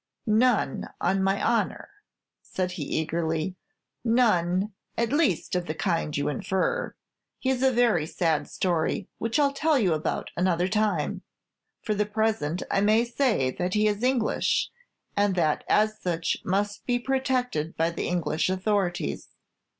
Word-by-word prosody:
"None, 220 - +2
on 190 +2 +1
my 195 +1 +1
honor," 225 -5 0 0.5
said 185 -1 -3
he, 180 -3 -6
eagerly; 160 +3 -1 0.5
"none, 210 -5 +2 0.2
at 235 +3 0
least, 290 - +1
of 180 -1 -1
the 155 - -3
kind 165 -5 -1
you 145 - 0
infer. 190 - -1 0.4
His 260 -1 +1
is 265 - +5
a - - -1
very 235 -10 +2
sad 160 -3 0
story, 180 +2 -1
which 230 +4 0
I 295 - +4
'll 280 - 0
tell 310 +1 +2
you 190 -9 +2
about 155 0 -2
at - - -3
another 180 -1 +2
time. 205 -6 0 0.6
For 215 - 0
the 210 0 0
present, 215 -6 0
I 195 - +2
may 215 +3 +4
say 235 - +1
that 180 +7 -2
he 215 0 +3
is 205 0 -1
English, 250 -3 +1 0.4
and 205 -2 +2
as 210 +7 +1
such 170 -2 -1
must 205 +2 -1
be 245 -1 +2
protected 250 - -1
by 165 +1 +2
the 170 - -3
English 175 -1 0
authorities. 190 -1 -1
195 Hz, 150 wpm, -26 LUFS, 170-230 Hz, 0.6 s, is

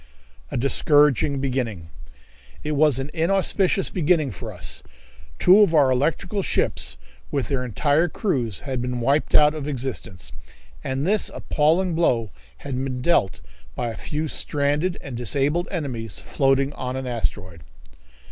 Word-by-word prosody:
A - - -3
Discouraging 140 +1 +3
Beginning. 120 -11 -3 0.7
It 150 - -2
was 150 -2 +3
an 135 +2 -4
inauspicious 190 +3 +2
beginning 160 -5 +1
for 95 - -7
us. - - -5 0.6
Two 185 +3 +6
of 200 -6 +4
our 140 -4 +5
electrical 165 +10 0
ships, - - 0 0.3
with 140 - -2
their 135 -3 -1
entire 145 - +1
crews, 125 - -2
had 130 -3 -3
been 125 0 -3
wiped 140 +5 +1
out 150 0 +6
of 150 -2 -5
existence, 125 -8 -5 0.5
and 135 +2 -2
this 210 +3 +2
appalling 165 +4 +1
blow 120 - +1 0.3
had 130 -2 -2
been 130 -2 -4
dealt 170 - +2 0.3
by 120 - -2
a 115 - -6
few 150 +8 -3
stranded 150 +5 -1
and 135 -3 -7
disabled 140 +8 0
enemies 125 - -4
floating 135 0 +1
on 125 0 -4
an 130 0 -4
asteroid. 100 -8 -4
140 Hz, 140 wpm, -23 LUFS, 125-155 Hz, 0.7 s, Two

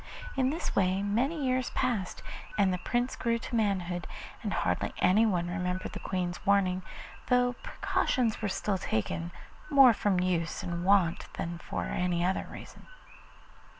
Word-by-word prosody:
In 260 -1 +2
this 320 +5 -3
way 190 0 +2
many 265 +9 0
years 255 -1 +1
passed, 235 -8 -1 0.3
and 195 -3 +3
the 180 - -2
Prince 245 +6 -1
grew 230 -1 0
to 235 - -5
manhood, 185 -6 0 0.3
and - - -3
hardly - - -1
anyone 185 -3 +3
remembered 180 +1 -2
the - - -5
Queen's 180 -2 -3
warning, 190 -2 +3 0.5
though 250 0 +3
precautions 235 -4 0
were 210 - 0
still 195 0 -1
taken, 165 +7 -2 0.4
more 270 -4 +8
from 200 -3 +1
use 180 -2 -1
and 170 0 -3
wont 185 -3 +2
than 170 0 -4
for - - -4
any 175 -1 0
other 190 +1 0
reason. - - -11
195 Hz, 150 wpm, -30 LUFS, 180-235 Hz, 0.5 s, more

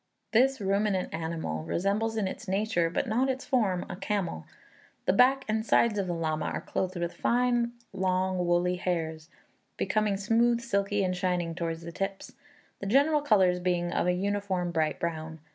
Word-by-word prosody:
This 265 +3 +3
ruminant 200 -1 0
animal 160 - -3
resembles 205 - -1
in 205 -3 0
its 205 +4 -7
nature, 190 -3 +1
but 165 - -1
not 245 +3 +1
in 265 - +1
its 265 - -12
form, 205 -9 +1
a 185 - -6
camel. 190 - -3 0.6
The - - +3
back 265 +5 +4
and 220 0 0
sides 225 -2 +3
of 195 - -1
the 175 - -1
llama 155 -2 -1
are - - -3
clothed 185 0 -3
with 170 0 -2
fine 240 -1 +1 0.2
long 185 -1 0
woolly 175 +1 +2
hairs, 160 -3 -3 0.5
becoming 215 -2 +1
smooth, 230 +4 +2
silky, 205 -3 0
and 185 -1 0
shining 180 -2 -1
towards 165 -1 -4
the 170 - -7
tips, 195 +2 -4 0.5
the 200 - -5
general 285 +7 +4
colours 190 -9 +3
being 175 -1 0
of - - 0
a 180 - +3
uniform 190 -2 -1
bright 160 -2 0
brown. 160 -1 -4
190 Hz, 175 wpm, -28 LUFS, 175-220 Hz, 0.6 s, back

